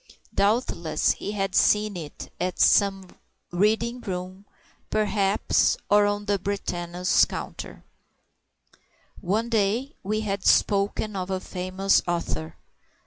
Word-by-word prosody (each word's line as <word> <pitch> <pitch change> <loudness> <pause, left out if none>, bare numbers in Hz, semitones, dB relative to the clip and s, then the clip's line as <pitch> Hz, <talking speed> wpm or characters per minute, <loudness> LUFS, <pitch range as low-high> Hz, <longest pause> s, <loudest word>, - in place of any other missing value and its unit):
Doubtless 200 -7 +1
he 205 - -4
had 195 -2 -2
seen 210 0 +3
it 160 -4 -8
at 180 0 -2
some 195 -2 +4 0.4
reading 220 +6 +1
room, 185 0 -6 0.4
perhaps, 210 - +2
or 205 0 +5
on 205 0 -2
Brentano's 180 -3 0
counter. - - -7 1.4
One 210 +5 0
day 225 +5 0
we 215 +2 -1
had 200 -2 -3
spoken 205 +1 +2
of 185 -1 -3
a 190 -1 -1
famous 185 +1 0
author. 80 - -3
195 Hz, 105 wpm, -25 LUFS, 185-210 Hz, 1.4 s, or